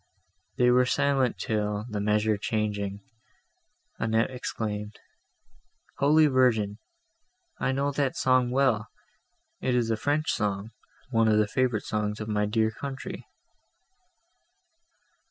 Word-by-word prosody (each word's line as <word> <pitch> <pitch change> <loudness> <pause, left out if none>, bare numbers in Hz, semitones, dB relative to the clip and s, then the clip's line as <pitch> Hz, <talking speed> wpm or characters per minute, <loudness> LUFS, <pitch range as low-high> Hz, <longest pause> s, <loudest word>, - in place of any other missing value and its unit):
They 125 0 +4
were 125 0 +4
silent 135 -2 +1
till, 105 -1 -2
the 105 -3 -4
measure 105 +1 +2
changing, 105 -1 -2 1.0
Annette 115 +2 +1
exclaimed, 105 -4 -4 1.0
"Holy 155 +3 +5
Virgin! 115 -7 +2 0.8
I - - +1
know 140 +2 0
that 140 -2 -1
song 130 -1 +3
well; 125 -4 +2 0.7
it 125 - 0
is 115 -2 +1
a - - +2
French 145 +6 0
song, 105 +1 -2 0.4
one 115 -2 +3
of 110 -1 +4
the 105 - +4
favourite 120 -1 0
songs 105 0 -2
of 110 - -5
my 105 -1 0
dear 110 +1 +1
country." 135 +4 -7
110 Hz, 120 wpm, -27 LUFS, 105-130 Hz, 1.0 s, Holy